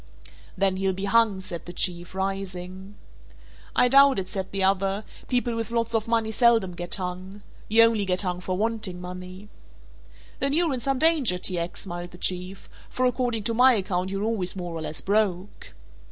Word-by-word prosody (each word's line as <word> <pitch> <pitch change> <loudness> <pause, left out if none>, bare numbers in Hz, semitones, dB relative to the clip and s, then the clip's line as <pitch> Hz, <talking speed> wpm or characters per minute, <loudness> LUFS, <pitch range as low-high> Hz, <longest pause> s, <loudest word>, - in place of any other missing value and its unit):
"Then 195 -1 +2
he'll 190 0 0
be 195 +2 -3
hung," 215 -2 +3
said 175 -3 -6
the 175 - -7
Chief, 175 0 -2
rising. 190 0 -5 0.8
"I 250 - +5
doubt 275 +1 +6
it," 185 -1 -3
said 190 -1 -4
the 195 -1 -1
other, 195 +2 +1 0.2
"people 245 -2 0
with 230 -1 -3
lots 230 0 -1
of 225 -1 0
money 230 -1 +1
seldom 225 -5 +3
get 175 0 -3
hung. 185 +2 -6 0.3
You 225 +2 +6
only 230 -2 +3
get 185 +1 +1
hung 180 -1 -3
for 185 0 -3
wanting 215 -4 -2
money." 180 +2 -9 0.9
"Then 275 +1 0
you're 330 -2 +2
in 255 - -2
some 270 +2 -1
danger, 290 - +3
T. 180 -1 -1
X.," 170 +1 -4
smiled 175 -2 -6
the 175 - -13
Chief, 185 +2 -2 0.2
"for 255 - -1
according 245 -3 0
to 230 - 0
my 250 +3 +6
account 185 -2 -2
you're 195 +1 -3
always 215 -5 -1
more 175 -2 -5
or 165 - -5
less 155 0 -4
broke." 200 -2 -1
195 Hz, 185 wpm, -25 LUFS, 180-230 Hz, 0.9 s, doubt